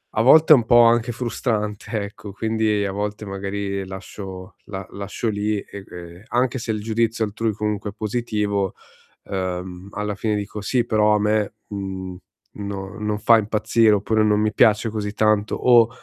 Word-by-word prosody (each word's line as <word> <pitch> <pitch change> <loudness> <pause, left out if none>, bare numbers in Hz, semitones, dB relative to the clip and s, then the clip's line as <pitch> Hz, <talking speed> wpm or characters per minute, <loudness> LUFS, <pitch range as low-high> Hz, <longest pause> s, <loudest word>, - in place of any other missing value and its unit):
a 110 - +3
volte 155 +5 +7
un 120 -7 +8
po' 120 0 +6
anche 120 +1 +3
frustrante 110 -3 -2
ecco, 100 0 -8
quindi 110 -1 0
a 95 - -2
volte 105 +1 -4
magari 100 0 -4
lascio 95 0 -9
la 95 -2 -6
lascio 100 +3 -4
lì 105 0 -1
e 100 -1 -10
e 85 +2 -10
anche 125 +1 0
se 110 - -3
il 105 -1 -3
giudizio 115 +1 0
altrui 110 +1 -2
comunque 105 -1 -3
è - - -20
positivo, 105 -3 -1 0.5
ehm, 95 0 -4
alla 105 0 -3
fine 105 +1 -1
dico: 105 0 -4
"Sì 120 +3 0
però 105 -2 +3
a - - +2
me, 105 0 0
mhmm, 95 -2 -5 0.4
no, 100 0 -6
non 105 0 -2
fa 115 +1 +6
impazzire" 110 +1 +2
oppure, 110 +2 +1
non 105 -1 +3
mi 110 0 +1
piace 110 0 +4
così 105 -1 -3
tanto, 110 -1 +2
o 120 -2 +5
105 Hz, 170 wpm, -22 LUFS, 100-110 Hz, 0.5 s, un